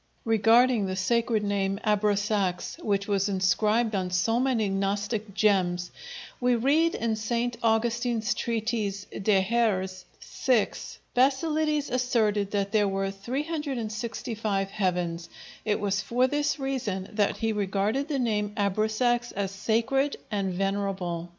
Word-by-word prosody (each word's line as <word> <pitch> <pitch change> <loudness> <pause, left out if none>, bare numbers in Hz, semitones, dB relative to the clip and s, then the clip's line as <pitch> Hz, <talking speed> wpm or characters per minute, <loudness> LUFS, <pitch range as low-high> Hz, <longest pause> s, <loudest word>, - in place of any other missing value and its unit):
Regarding 225 0 +4
the 185 - -2
sacred 225 +3 +1
name 200 -1 0
Abrasax, 205 -3 0
which 200 -1 0
was 200 0 +1
inscribed 210 +4 +2
on 185 -2 -1
so 180 +6 +1
many 250 -5 +1
Gnostic 200 +2 -2
gems, 180 -4 +2 0.5
we 245 -1 +3
read 295 +8 +2
in 225 -1 -1
St. 235 +2 -1
Augustine's 230 0 +1
treatise 220 -3 -2
De 195 -1 +2
hæres., 190 -4 0
vi, 245 -5 +1 0.4
"Basilides 300 +3 +1
asserted 225 -5 +1
that 200 -1 -1
there 210 -1 +3
were 195 0 -1
365 230 -5 -3
heavens; 175 -4 -1 0.4
it 210 -2 +1
was 200 0 0
for 240 +5 +1
this 290 +3 0
reason 245 -9 -3
that 210 -1 +1
he 225 -1 0
regarded 210 +6 0
the 295 -3 -1
name 210 -4 -1
Abrasax 220 +4 +1
as 195 -1 -2
sacred 235 +8 0
and 200 -2 -1
venerable." 190 -3 -2
215 Hz, 125 wpm, -27 LUFS, 195-235 Hz, 0.5 s, Regarding